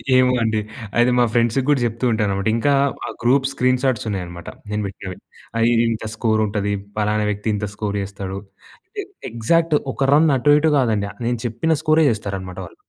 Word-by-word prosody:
ఏమో 130 0 +5
అండి. 110 -1 +1 0.4
అది 125 +1 +4
మా 120 - +5
ఫ్రెండ్స్‌కి 120 +2 +2
కూడా 145 -2 +4
చెప్తూ 115 +2 -2
ఉంటానన్నమాట. 100 -3 0
ఇంకా 140 +5 +2 0.4
ఆ - - -4
గ్రూప్ 130 +3 +3
స్క్రీన్ 130 -1 +1
షాట్స్ 130 -5 0
ఉన్నాయన్నమాట 85 -4 -5 0.2
నేను 105 0 -1
పెట్టినవి. 95 -1 -8 0.4
ఆహ్, 115 - +3
ఇది 115 0 +3
ఇంత 110 0 -4
స్కోర్ 110 -1 +1
ఉంటది. 100 0 -1 0.2
పలానా 105 0 +1
వ్యక్తి 105 +1 -4
ఇంత 105 0 -3
స్కోర్ 105 -1 -3
చేస్తాడు. 95 -1 -5 0.5
అంటే 410 +2 -6 0.3
ఎగ్జాక్ట్ 160 +8 +2 0.2
ఒక 135 -1 0
రన్ 155 +2 +5
అటు 145 +4 +4
ఇటు 160 +1 +2
కాదండి. 110 -5 +1 0.2
నేను 120 -1 -1
చెప్పిన 120 +8 -1
స్కోరే 155 0 +4
చేస్తారన్నమాట 95 -4 -5
వాళ్ళు. 85 - -14
115 Hz, 175 wpm, -21 LUFS, 100-130 Hz, 0.5 s, ఏమో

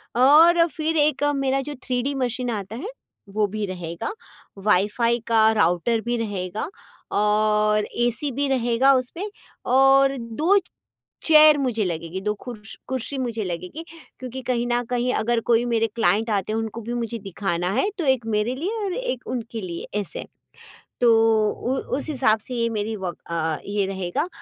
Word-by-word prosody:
और 325 +7 +6
फिर 320 0 -2
1 295 0 +2
मेरा 270 0 0
जो 290 - -5
थ्रीडी 255 +2 -1
मशीन 250 -1 -2
आता 205 0 -5
है, 340 - -5 0.4
वो 210 +1 +1
भी 215 +1 -3
रहेगा, 175 - -5 0.5
वाईफाई 210 +4 +2
का 220 -1 +5
राउटर 195 +5 +2
भी 240 +1 -2
रहेगा 205 - -3 0.5
और 210 0 +2 0.2
एसी 255 +4 -1
भी 280 +3 -1
रहेगा 255 +1 +3
उसमें 300 +11 -2 0.4
और 270 +1 +5
2 300 - +1 0.7
चेयर 305 -1 +7
मुझे 245 -6 0
लगेगी 170 +2 -4
2 210 +1 0
खुर्स 220 -3 -8
कुर्सी 260 +2 -3
मुझे 235 -4 -2
लगेगी। 180 - -5 0.4
क्योंकि 255 0 -6
कहीं 240 -1 0
न 240 0 +1
कहीं 250 +1 0
अगर 235 +1 +1
कोई 235 +1 +4
मेरे 225 -1 +1
क्लाइंट 220 +1 +2
आते 205 0 -1
हैं 225 - 0
उनको 225 +1 -5
भी 235 +2 -5
मुझे 235 -1 -3
दिखाना 180 -2 -2
है, 265 - +1
तो 330 - -2
1 265 -3 +2
मेरे 225 +3 0
लिए 365 +11 -3
और 375 - -2
1 - - -4
उनके 230 -2 -4
लिए 170 -2 -6
ऐसे। 200 - -5 0.8
तो 240 -1 +5 0.4
उ 260 +2 -2 0.2
उस 300 - -3
हिसाब 235 -6 +3
से 250 - -7
ये 230 -1 0
मेरी 215 0 -2
वर्क 185 -3 -5
अ, 160 -2 -1
ये 200 -1 0
रहेगा 190 - -2
230 Hz, 165 wpm, -23 LUFS, 210-265 Hz, 0.8 s, चेयर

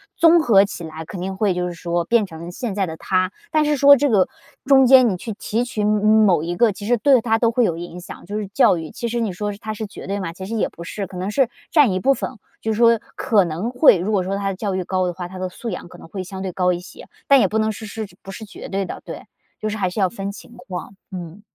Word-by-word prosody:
综 335 +1 +6
合 210 -9 +5
起 195 -3 -6
来 160 0 -7
肯 185 - -8
定 190 +1 -4
会， 205 -3 +2
就 180 0 -2
是 175 - -5
说 170 0 -2
变 230 0 +3
成 170 -1 -9
现 225 +3 -4
在 200 -2 +1
的 160 -2 -6
他。 185 +1 +1 0.3
但 310 -1 +3
是 295 0 +2
说 280 +1 +8
这 285 +2 +1
个 200 -6 +3 0.4
中 270 -1 +6
间 255 -1 +7
你 185 - -2
去 220 +4 -6
提 225 +3 -2
取 220 -4 -3
某 210 0 +2 0.2
某 175 -6 +3
一 175 +1 -3
个， 230 +2 +4
其 205 +1 -8
实 245 - +4
对 270 +2 +5
他 225 -1 +1
都 230 -1 +3
会 240 0 +2
有 170 - 0
影 175 +1 -7
响， 175 - -11
就 205 +4 -4
是 210 - -4
教 190 - +4
育， 160 -1 -6
其 235 - -4
实 240 +1 -2
你 220 -4 -1
说 205 +3 -3
它 215 0 -5
是 215 +1 -5
绝 200 - -10
对 200 +1 -2
吗？ 165 -3 -4
其 190 +2 -8
实 225 +4 -4
也 215 - 0
不 170 - -14
是， 195 +3 -5
可 185 - -10
能 185 +2 -3
是 260 0 +2 0.2
占 295 - +5
一 185 - -1
部 275 +8 +3
分， - - -4 0.3
就 220 - -1
是 215 - -2
说 230 0 +5 0.2
可 220 -7 +3
能 170 +7 -3
会 250 -4 +6
如 185 +5 -2
果 190 -3 +2
说 195 +2 -2
他 200 - -2
的 190 - -3
教 195 -1 -3
育 185 - -1
高 185 0 0
的 175 - -2
话， 175 0 -6
他 185 +1 -10
的 185 0 -3
素 230 +6 -7
养 180 - -6
可 - - -13
能 - - -13
会 185 +3 -5
相 190 +1 -8
对 190 - -3
高 180 0 +2
一 175 - -2
些。 180 - -13 0.2
但 275 -1 +7
也 200 - +4
不 220 - -1
能 220 0 +1
是 220 +1 -8
是 215 0 -6 0.2
不 195 - -8
是 220 +3 -8
绝 205 - -10
对 195 0 -1
的， - - -7
对。 - - -8 0.3
就 215 - -3
是 215 - -4
还 190 -3 0
是 180 - -5
要 190 - +3
分 195 0 -5
情 225 - -13
况。 180 0 -7 0.2
嗯。 180 +1 -8
200 Hz, 315 characters per minute, -21 LUFS, 180-230 Hz, 0.4 s, 说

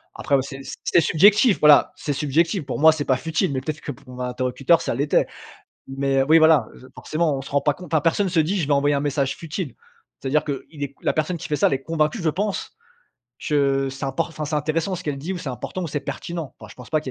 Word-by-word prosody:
Après, 140 - 0
bah, 135 - +3
c'est 135 0 -8 0.2
c'est 170 - +3
subjectif 205 - +4
voilà, 150 -1 +6
c'est 145 - -3
subjectif. 155 +4 0
Pour - - -4
moi, 160 +1 +7
c'est 155 -2 -3
pas 130 - +2
futile, 160 +2 -1
mais, 130 - -2
peut-être, 155 +3 -5
que 145 - -5
pour 140 +1 -21
mon 125 - -10
interlocuteur, 130 +6 +1
ça - - -2
l'était. 145 +3 +2 0.6
Mais, 135 0 +1
oui, 155 +4 +5
voilà, 160 -7 +5
je 130 - -14
forcément 155 -2 -1
on 135 - -5
se - - -10
rend 140 0 +2
pas 145 0 +1
compte, 180 -2 -12
hein. 160 - +4
Personne 170 +5 +1
se 165 -2 +3
dit: 180 +6 0
«Je 150 - -1
vais 145 - +1
envoyer 145 +1 +2
un 140 - 0
message 140 -1 -1
futile». 165 - -5 0.5
C'est-à-dire 140 +3 +1
qu'il 145 +1 -6
est 140 - -7
la - - +1
personne 155 +3 -1
qui - - -7
fait 150 - 0
ça, - - +3
elle - - -5
est 135 - -4
convaincue, 165 - -1
je 165 - +1
pense, 200 +5 -3 0.8
que, 140 -2 +2
c'est 135 +1 -5
import 165 +5 -2
enfin, 155 -2 -5
c'est 150 - -2
intéressant 155 +5 -1
ce - - -8
qu'elle 145 -2 -3
dit 165 +7 -4
ou 180 - -4
c'est 150 - -5
important 130 +9 -5
ou 170 - -3
c'est 145 0 -3
pertinent. 165 -1 -6
Enfin, 110 - -12
je - - -13
pense 125 - -12
pas 155 -1 +1
qu'il 130 - -6
150 Hz, 260 wpm, -22 LUFS, 135-165 Hz, 0.8 s, moi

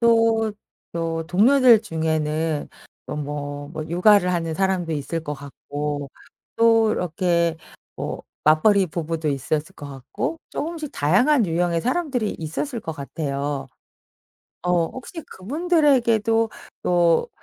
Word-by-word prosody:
또, 225 -2 +3 0.4
또 165 -1 -2
동료들 235 +6 +6
중에는 160 -1 -1 0.4
또 - - -5
뭐, 145 -1 -5
뭐 155 -1 -5
육아를 180 +2 +4
하는 165 -2 -1
사람도 190 -2 0
있을 155 +2 -3
것 150 -1 -4
같고 145 0 -5 0.5
또 225 -1 +5
이렇게 170 -1 0 0.4
뭐 - - -5 0.2
맞벌이 185 +6 +5
부부도 160 -1 -3
있었을 150 +3 -2
것 145 - -9
같고 135 - -4
쪼금씩 315 -2 -4
다양한 215 - +3
유형의 170 0 0
사람들이 255 - -1
있었을 225 - -4
것 165 - -5
같아요. 140 -1 -3 1.0
어 180 -2 +2
혹시 260 - -8
그분들에게도 235 - +2 0.3
또 175 -2 +3
170 Hz, 245 characters per minute, -23 LUFS, 155-225 Hz, 1.0 s, 동료들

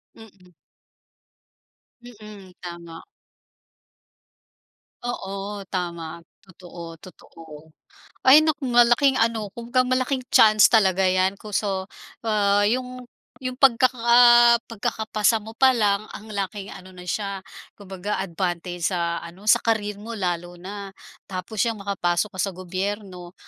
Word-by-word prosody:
Mm. 195 -5 -17 1.5
Mm, 210 -5 -13
tama. 170 -2 -9 2.0
Oo 200 -3 -5
tama, 170 -3 -4 0.2
totoo, 170 -3 -11
totoo. 160 -3 -14 0.6
Ay 280 +4 +8
naku, 305 -3 -1
malaking 240 +3 +4
ano 225 -3 0
kung 235 0 -9
ka 255 0 +3
malaking 255 0 -1
chance 215 -4 +6
talaga 190 -4 +3
'yan. 185 +1 +1
Ko 210 -1 -9
so, 190 -1 -1 0.8
yung 250 +2 -3 0.4
yung 255 0 -3
pagkaka 240 -1 +5
pagkakapasa 220 -1 0
mo 220 +1 -11
pa 260 +3 +5
lang, 210 -2 +1
ang 215 +1 -10
laking 200 0 -4
ano 185 0 -12
na 180 - -11
siya, 200 0 -3 0.4
kumbaga, 195 0 -5
advantage 175 -1 -3
sa 170 -2 -1
ano 170 +3 -12
sa 215 - +6
career 210 -3 -1
mo 230 +1 -7
lalo 175 -1 -3
na. 200 +2 -8 0.4
Tapos, 185 +3 -6
yang 225 -2 -2
makapasok 190 -1 -1
ka - - +1
sa 195 - -1
gobyerno 185 0 -5
200 Hz, 120 wpm, -23 LUFS, 180-230 Hz, 2.0 s, Ay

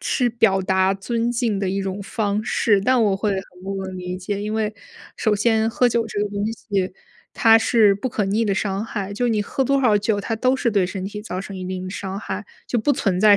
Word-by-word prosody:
是 245 -2 +1
表 210 -5 +2
达 190 +1 +2
尊 230 +4 -1
敬 230 -4 0
的 195 -2 -1
一 195 +1 -1
种 195 +1 -4
方 210 +1 -1
式， 210 -3 +2
但 250 +2 +3
我 200 -3 +2
会 205 +1 0
很 190 - -1 0.2
不 195 0 -3
能 185 -1 -6
理 180 0 -4
解， 200 +2 -3
因 210 +1 -3
为 215 -1 0 0.4
首 215 -2 +1
先 220 +1 +2
喝 245 +2 +3
酒 230 -1 0
这 205 -1 -3
个 210 - -1
东 200 0 -4
西， 195 -4 -2 0.4
它 225 -1 +6
是 220 -3 +4
不 255 +5 -3
可 210 -3 -1
逆 210 +4 +1
的 200 -2 +1
伤 195 +1 -1
害， 200 -3 -4
就 245 +4 0
你 215 -3 +1
喝 265 +5 -1
多 275 +1 +2
少 215 -5 +4
酒， 205 0 0
它 225 +2 -2
都 255 +3 +2
是 240 -3 0
对 195 -4 +2
身 185 0 -5
体 210 +1 -5
造 185 -3 -5
成 195 0 -7
一 185 - -5
定 185 0 -4
的 185 - -5
伤 195 -1 -5
害， 205 0 -5 0.2
就 240 - +1
不 290 +6 +2
存 190 -8 0
在 205 0 +7
205 Hz, 265 characters per minute, -22 LUFS, 195-225 Hz, 0.4 s, 在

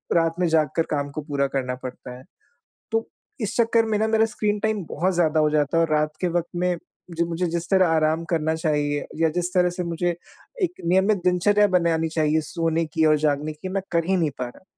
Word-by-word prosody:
रात 165 -1 +2
में 180 - +2
जाग 160 -2 +2
कर 165 - +4
काम 145 -1 -1
को 155 - -5
पूरा 140 -2 -1
करना 125 -1 -2
पड़ता 125 -1 -8
है। 130 - -14 0.7
तो 225 0 0 0.3
इस 215 - -3
चक्कर 230 -1 +3
में 215 -1 0
ना, 220 - +2
मेरा 220 0 +3
स्क्रीन 210 -1 0
टाइम 220 -3 -1
बहुत 180 +4 0
ज़्यादा 160 -2 +2
हो 150 0 +3
जाता 150 +1 +1
है - - +4
और 160 - -5
रात 150 0 +1
के 180 - +1
वक़्त 175 0 -1
में, 180 0 +1 0.3
जो 170 0 -1
मुझे 170 +1 -2
जिस 170 0 -5
तरह 190 -2 +5
आराम 160 +1 +1
करना 160 -1 +1
चाहिए, 150 -2 -1
या 165 0 +2
जिस 180 0 -1
तरह 180 -1 +3
से 180 - -2
मुझे 170 0 -1 0.5
एक 360 0 -1
नियमित 190 +4 +3
दिनचर्या 205 +3 +4
बनानी 165 -2 +1
चाहिए, 155 0 +2
सोने 165 -1 0
की 160 +1 0
और 155 0 +5
जागने 150 +1 0
की, 155 +5 -8
मैं 195 +1 -2
कर 170 -1 +2
ही 190 - +3
नहीं 160 -4 +1
पा 125 - -2
रहा। 125 - -16
165 Hz, 225 wpm, -23 LUFS, 155-185 Hz, 0.7 s, तरह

